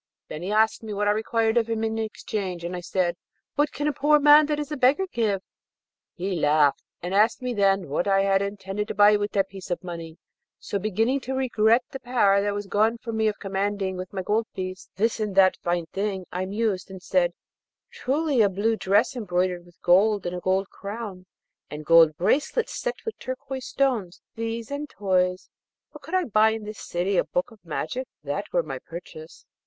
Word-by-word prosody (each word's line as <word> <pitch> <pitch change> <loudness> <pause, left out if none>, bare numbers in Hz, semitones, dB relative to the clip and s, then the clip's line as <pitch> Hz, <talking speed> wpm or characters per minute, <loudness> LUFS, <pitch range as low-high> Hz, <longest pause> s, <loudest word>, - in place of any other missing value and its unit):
Then 155 - -6
he 185 +3 -3
asked 220 +1 +2
me 215 -2 -6
what 205 +1 0
I - - +5
required 225 +1 +1
of 230 -1 +2
him 225 -1 -1
in 220 0 -1
exchange, 200 -5 -4
and 175 +1 -4
I - - -4
said, 175 0 -1 0.4
'What 295 0 +1
can 295 - -2
a 300 - +1
poor 295 +3 +3
old 295 - +3
man 295 0 +8
that 300 -1 -1
is 295 0 -5
a - - -1
beggar 275 +8 +3
give?' 205 -5 0 0.7
He 185 +1 -2
laughed, 150 -2 +3 0.2
and 180 +2 -3
asked 215 +5 +3
me 250 -1 -1
then 195 -3 +2
what 150 +7 -1
I 195 0 +3
had 195 0 +3
intended 200 +1 -3
to - - -5
buy 205 +1 +6
with 205 0 -2
that 195 -1 +1
piece 190 -1 -10
of 175 - -3
money. 165 -2 -7 0.4
So, 200 - -4
beginning 225 +7 +1
to 265 0 -4
regret 235 -2 +3
the 270 - -6
power 205 -6 +3
that 205 0 -1
was 205 0 -4
gone 220 +4 +2
from 230 0 -6
me 220 0 +2
of 210 - -1
commanding 195 -1 -2
with 185 0 -6
my 190 -2 -4
gold 220 +3 0
piece 185 0 -6
this 225 +4 0
and 210 -3 -2
that 190 -1 +5
fine 175 -1 -1
thing, 195 -2 -2
I 185 +2 -3
mused, 205 -2 -1
and 190 -1 -8
said, 175 -2 +2 0.6
'Truly, 300 - 0
a 205 - +5
blue 205 +4 0
dress 205 +7 +2
embroidered 180 -5 -1
with 175 - -21
gold, 200 +3 +4
and 175 0 -2
a - - -3
gold 190 +2 0
crown, 200 -3 -7 0.4
and 150 +1 -7
gold 165 -1 +6
bracelets 290 - +1
set - - -2
with 450 - -5
turquoise 260 0 -6
stones, 235 -10 -1
these, 230 +1 -4
and 290 +1 -4
toys; 185 -2 0 0.4
but 300 - -11
could 325 +6 -5
I 370 - +3
buy 220 - +4
in 220 -1 -5
this 215 +1 -8
city 180 +3 -1
a - - +4
book 180 - -2
of 215 -6 -18
magic, 175 - -4 0.2
that 150 +8 -4
were 175 - +2
my 135 -4 -6
purchase.' 165 0 -11
205 Hz, 210 wpm, -25 LUFS, 185-230 Hz, 0.7 s, man